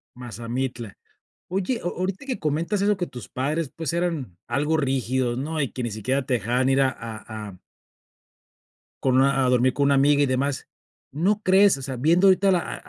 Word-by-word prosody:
Mazamitla. 120 -1 -5 0.6
Oye, 195 +6 -1
o-o 175 - -4
Ahorita 190 +8 -3
que 260 -6 -3
comentas 165 +6 -1
eso 205 0 +2
que 175 - -1
tus 125 - -10
padres, 145 +3 -2
pues, 165 -2 -3
eran 165 - -2
algo 145 +6 0
rígidos, 130 -3 0
¿no? 155 +3 -3
Y 140 - -1
que 130 - -4
ni 120 - -2
siquiera 130 +6 -1
te 130 - +1
dejaban 125 +4 0
ir 135 0 +3
a 135 - +4
a 110 -2 -8
a 90 - -12 1.4
con 130 -1 +2
una 135 0 +3
a 125 - +2
dormir 125 0 +3
con 140 - +1
una 140 - +4
amiga 145 +1 +4
y - - +4
demás, 135 +1 -1 0.4
¿no 195 +9 0
crees? 190 -3 +5
O 135 - -8
sea, 130 0 -5
viendo 165 +9 +3
ahorita 195 +1 +4
a - - +5
la 180 - +3
a - - -5
135 Hz, 200 wpm, -24 LUFS, 125-170 Hz, 1.4 s, crees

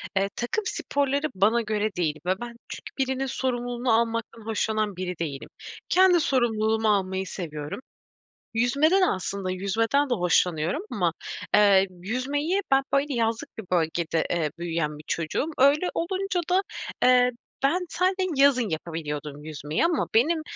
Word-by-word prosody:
eee, 195 +1 +2
takım 245 - -2
sporları 285 -3 0
bana 215 +5 +3
göre 215 -2 -1
değil 160 -4 0
ve 185 - +3
ben 240 -1 -6
çünkü - - -8
birinin 265 0 0
sorumluluğunu 245 -1 -1
almaktan 230 -1 0
hoşlanan 215 -2 -1
biri 180 -1 -4
değilim. 145 -5 -4 0.4
Kendi 365 -1 +5
sorumluluğumu 225 -5 +1
almayı 190 -1 -2
seviyorum. 150 -1 -5 0.7
Yüzmede 280 +9 +3
de - - +6
aslında 190 - -2
yüzmeden 225 +9 +1
de - - +2
hoşlanıyorum 180 - +1
ama, - - 0 0.4
eee, 200 -2 +6
yüzmeyi 260 - -2
ben, 270 0 +5
böyle, 280 +1 +2
yazlık 230 -2 -2
bir 220 - -7
bölgede, 165 -1 0
eee, 160 -4 0
büyüyen 165 -3 -2
bir 150 - -12
çocuğum. 165 - -1
Öyle 285 +6 +4
olunca 375 +1 -1
da, 370 +2 +4 0.4
eee, 250 0 +5 0.3
ben 360 +7 +2
sade 370 +1 +1
yazın 270 -5 +4
yapabiliyordum 150 -3 -5
yüzmeyi 155 - -2
ama 335 -2 +1
benim, 315 +8 +3
225 Hz, 140 wpm, -26 LUFS, 180-275 Hz, 0.7 s, de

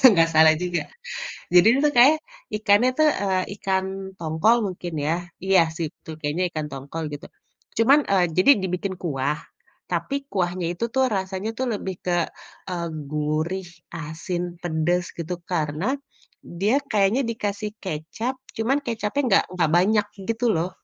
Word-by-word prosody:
nggak 165 -3 +4
salah 160 0 +7
juga. 175 +1 -1 0.7
Jadi 180 +2 +7
dia 250 +4 +4
itu - - +6
kayanya 280 +6 +7 0.4
ikannya 210 +3 +4
tuh, 310 0 +6
eee, 190 -2 +1 0.2
ikan 190 -1 +1 0.3
tongkol 165 +7 +3 0.2
mungkin 175 -1 -7
ya 155 - +2 0.3
iya 190 -2 +5 0.2
sih 170 -2 -1
itu - - -13
kayanya 155 +5 -1
ikan 155 -2 -4
tongkol 140 +4 -6
gitu. 145 - -7 0.5
Cuman, 260 +6 +6
eee, 195 -2 +4
jadi 185 +9 +6
dibikin 185 +1 -2
kuah, 145 -3 -1 0.6
tapi 275 - -1 0.2
kuahnya 180 -2 0
itu 175 +6 -3
tuh 265 0 +4
rasanya 190 +2 -3
tuh 260 - 0
lebih 190 -2 -4
ke, 175 -1 +1 0.6
eee, 170 -1 -2 0.2
gurih, 155 +5 -1 0.3
asin, 165 +3 -4 0.2
pedes, 175 +1 0
gitu. 170 +1 -3 0.2
Karena 155 0 -1 0.7
dia 210 +7 +3
kayaknya 210 +3 +3
dikasih 210 -1 -3
kecap 190 - -3 0.2
cuman 240 +6 +1
kecapnya 230 +3 -1
enggak 200 -5 +4
enggak 175 -4 +1
banyak 210 +4 +3 0.2
gitu 230 +2 -1
loh, 165 +3 0
185 Hz, 145 wpm, -24 LUFS, 165-210 Hz, 0.7 s, salah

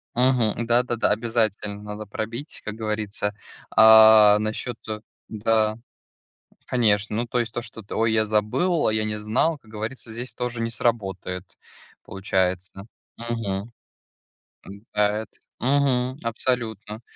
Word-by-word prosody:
Мгм. 120 -2 +2
Да-да-да, 120 0 +1
обязательно 105 -2 -1
надо 105 +1 -7
пробить, 115 +8 -5
как 105 - -4
говорится, 105 -2 -3 0.4
а, 110 -1 +8
насчет 110 +3 -3 0.5
да, 110 0 +1 0.9
конечно, 105 -4 +1
ну, 120 - 0
то 125 - -1
есть, 120 -2 -2
то, 120 - -2
что-то 110 -2 -8
ой, 115 0 +2
я 110 -1 +3
забыл, 110 - +1
а - - +2
я 110 0 0
не 105 0 -2
знал, 110 +10 0
как 110 -5 -21
говорится, 110 +3 -6
здесь 120 +3 -6
тоже 125 -1 -4
не 115 0 -1
сработает, 95 -6 -2 0.5
получается. 95 0 -2 0.3
Мгм. 115 -3 -4 1.3
Заяц. 105 +1 0 0.2
Мгм. 130 -1 +1
Абсолютно, 110 -2 -2
110 Hz, 120 wpm, -24 LUFS, 105-120 Hz, 1.3 s, а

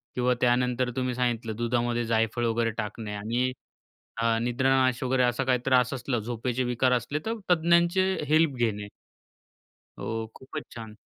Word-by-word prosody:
किंवा 125 0 +2
त्यानंतर 125 0 +2
तुम्ही 130 -1 -1
सांगितलं 120 -3 -1
दुधामध्ये 120 +1 0
जायफळ 115 +1 0
वगैरे 115 0 +1
टाकणे 105 0 -4
आणि 120 +5 -1 0.7
अ, 115 -1 +2
निद्रानाश 130 +1 +2
वगैरे 130 0 +2
असा 125 +2 +1
काही 130 -1 +2
त्रास 125 -2 +3
असलं, 130 -1 -2
झोपेचे 120 +3 -2
विकार 125 +1 +1
असले, 125 +4 0
तर 225 - 0 0.2
तज्ञांचे 170 +2 +4 0.3
हेल्प 155 -1 +3
घेणे. 110 -4 -1 1.1
हो, 115 0 -3
खूपच 150 +3 -7
छान. 110 -2 -9
125 Hz, 140 wpm, -27 LUFS, 115-130 Hz, 1.1 s, तज्ञांचे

